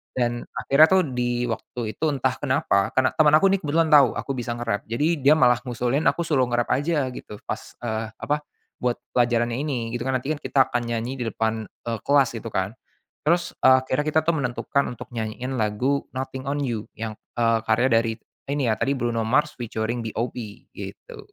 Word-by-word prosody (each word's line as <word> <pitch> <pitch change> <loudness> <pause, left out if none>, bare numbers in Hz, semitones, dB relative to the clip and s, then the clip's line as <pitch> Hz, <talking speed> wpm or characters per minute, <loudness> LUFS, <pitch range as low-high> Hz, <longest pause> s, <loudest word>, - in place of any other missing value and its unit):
dan 120 -1 0
akhirnya 155 +4 +5
tuh 190 -1 +4
di 120 -2 -1
waktu 115 0 -4
itu 160 - -2
entah 130 -2 0
kenapa 105 -7 +1
karena 130 0 +3
teman 150 -2 +5
aku 195 - +2
nih 195 - +2
kebetulan 160 +2 +2
tahu 140 -5 +7
aku 140 - -3
bisa 120 -1 -3
nge-rap, 115 -4 -2
jadi 150 +7 +1
dia 145 +3 +6
malah 125 -3 +5
ngusulin 125 +4 0
aku 170 - -1
suruh 135 -5 +3
nge-rap 120 0 0
aja 145 -1 +1
gitu, 105 -4 -9
pas, - - -6
eee, 110 -1 -2
apa, 150 +1 -2 0.4
buat 125 -1 +1 0.2
pelajarannya 120 0 +2
ini. 125 -6 -2
Itu 120 +2 -3
kan 130 - +1
nanti 135 +5 -4
kan 145 - -7
kita 135 -2 +2
akan 125 - +1
nyanyi 125 +4 -4
di - - -1
depan, 110 -1 -1
eee, 115 -2 -6
kelas 140 -2 +4
gitu 115 0 -5
kan. 95 +3 -1 0.5
Terus, 170 +2 +1
eee, 130 0 +7
akhirnya 130 +3 0
kita 155 +1 +3
tuh 170 - +3
menentukan 140 +1 0
untuk 120 - -10
nyanyiin 115 +3 -4
lagu 125 +7 0
Nothing 130 +1 -5
on 145 - -1
You, 115 -5 -3
yang, 110 -1 -4 0.2
eee, 115 -1 +3
karya 115 +4 +3
dari, 115 0 +3 0.4
ini 140 -2 0
ya, - - +2
tadi 140 +1 +1
Bruno 120 -2 -1
Mars 150 +5 +2
featuring 115 0 -2
B.o.B, 115 +2 -3 0.4
gitu. - - -9
125 Hz, 195 wpm, -24 LUFS, 115-140 Hz, 0.5 s, tahu